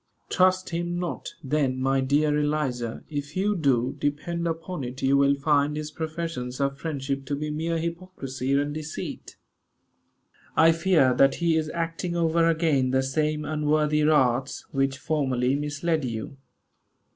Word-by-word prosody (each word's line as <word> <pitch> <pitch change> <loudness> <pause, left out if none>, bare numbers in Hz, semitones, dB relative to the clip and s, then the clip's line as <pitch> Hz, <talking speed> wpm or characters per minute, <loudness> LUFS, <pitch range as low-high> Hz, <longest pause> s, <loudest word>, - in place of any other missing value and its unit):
Trust 185 0 +3
him 175 +1 -2
not, 175 -1 -4
then, 135 -2 0
my 135 +1 +2
dear 145 +3 +2
Eliza; 135 -6 -1
if 145 +1 -5
you 205 +2 +1
do, 130 -6 +1
depend 170 +4 -2
upon 165 -1 -4
it 125 +2 -6
you 135 +1 +4
will 140 0 +4
find 145 +1 +1
his 155 0 -4
professions 155 -5 -4
of 140 0 0
friendship 140 -3 -3
to 145 - -1
be 150 +1 -3
mere 165 +2 -1
hypocrisy 165 -6 -4
and 145 +1 +1
deceit. 155 0 -6 1.2
I 165 0 +7
fear 165 -6 +3
that 135 +2 +4
he 170 -1 +1
is 155 -1 0
acting 170 +1 -3
over 165 0 +2
again 155 -6 +2
the 130 +1 +2
same 150 +2 -1
unworthy 150 0 +1
arts 135 -4 +2
which 135 -1 0
formerly 130 -4 0
misled 150 +2 -1
you. 115 +1 -4
150 Hz, 145 wpm, -26 LUFS, 135-165 Hz, 1.2 s, I